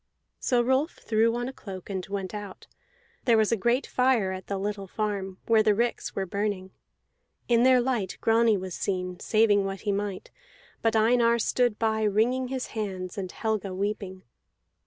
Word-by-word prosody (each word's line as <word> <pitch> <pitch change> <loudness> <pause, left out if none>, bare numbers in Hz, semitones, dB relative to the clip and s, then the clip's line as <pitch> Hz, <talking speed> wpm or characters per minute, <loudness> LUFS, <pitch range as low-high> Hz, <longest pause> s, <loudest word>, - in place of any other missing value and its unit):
So 245 -2 +2
Rolf 265 +6 +1
threw 225 +1 +1
on 245 0 -2
a 265 - -6
cloak 190 -7 -9
and 190 -2 -3
went 195 -1 -4
out; 205 -2 -7 0.6
there 235 -3 +5
was 220 0 +3
a - - +4
great 240 +6 +1
fire 250 -7 +2
at 185 0 -7
the 200 - -2
little 200 0 -3
farm, 195 -2 -3
where 225 -1 +4
the 210 -1 +3
ricks 235 +2 -1
were 195 - -1
burning. 200 -1 -3 0.8
In 235 -1 +4
their 255 0 +6
light 240 -7 -1
Grani 225 -1 +3
was 185 -1 -6
seen, 180 -1 -3
saving 215 -2 +3
what 195 0 -4
he 210 - -1
might; 200 -1 -3 0.5
but 225 0 +1
Einar 235 +1 +4
stood 240 0 +1
by 220 -1 0
wringing 225 +5 +2
his 260 0 -3
hands, 190 -5 -4
and 185 -3 -4
Helga 215 -4 -2
weeping. 195 -1 -3
215 Hz, 175 wpm, -27 LUFS, 195-235 Hz, 0.8 s, their